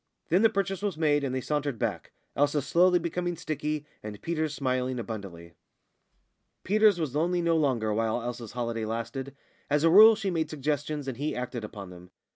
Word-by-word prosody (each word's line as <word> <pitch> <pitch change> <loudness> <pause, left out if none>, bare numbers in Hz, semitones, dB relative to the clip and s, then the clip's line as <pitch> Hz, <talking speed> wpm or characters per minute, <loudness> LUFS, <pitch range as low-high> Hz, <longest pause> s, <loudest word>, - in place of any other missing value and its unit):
Then 180 +4 +4
the 225 - +6
purchase 195 -3 -2
was 200 -6 -2
made, 145 -2 +2
and 130 -2 -2
they 130 - -1
sauntered 145 -2 -2
back - - -3 0.2
Elsa 145 0 +1
slowly 180 +5 +4
becoming 175 0 -3
sticky, 150 0 -3 0.2
and 105 -1 -8
Peters 160 -2 -2
smiling 130 -2 -1
abundantly. 100 -8 -7 1.1
Peters 210 -1 +4
was 155 -6 -2
lonely 175 +3 +1
no 170 -1 +2
longer 125 -9 +1
while 115 +2 0
Elsa's 120 -2 -6
holiday 115 -2 -3
lasted. 115 +5 -5 0.3
As 145 +1 +2
a 165 - +5
rule 215 +4 +9
she 205 -3 -2
made 160 -3 -1
suggestions, 145 0 -3
and 130 -3 -4
he 150 +3 -2
acted 125 -2 -4
upon 100 -3 -8
them. 90 0 -13
145 Hz, 180 wpm, -28 LUFS, 120-170 Hz, 1.1 s, rule